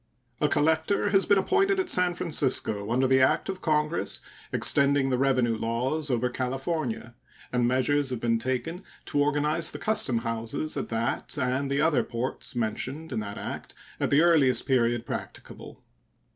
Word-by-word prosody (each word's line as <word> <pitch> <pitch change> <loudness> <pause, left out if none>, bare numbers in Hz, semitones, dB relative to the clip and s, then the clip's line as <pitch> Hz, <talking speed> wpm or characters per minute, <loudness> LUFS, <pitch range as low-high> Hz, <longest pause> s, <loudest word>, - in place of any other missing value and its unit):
A 150 - +2
collector 160 +8 +1
has 195 -1 +3
been 200 - +5
appointed 390 - +2
at 375 - 0
San 180 - +2
Francisco 125 - 0
under 130 +3 +2
the 130 0 +4
act 130 - +2
of 190 -1 -4
Congress 155 0 0 0.3
extending 140 -1 +3
the 125 - +1
revenue 130 -4 +2
laws 125 +7 -1
over 125 -1 +1
California, 135 - -3 0.4
and 125 -1 +2
measures 130 +3 +1
have 125 -2 -3
been 115 -1 +1
taken 130 - -3 0.2
to 145 - 0
organize 150 +3 +1
the - - -6
custom 180 - +1
houses 115 +6 -2
at 135 - -4
that 115 +6 -2
and 130 +1 -1
the 140 +1 0
other 155 -3 +2
ports 120 +2 -4
mentioned 130 +7 -3
in - - -2
that 100 -1 -6
act - - -7 0.2
at - - 0
the 140 +2 +4
earliest 155 -7 +3
period 120 -2 +1
practicable. - - -8
135 Hz, 160 wpm, -27 LUFS, 125-160 Hz, 0.4 s, been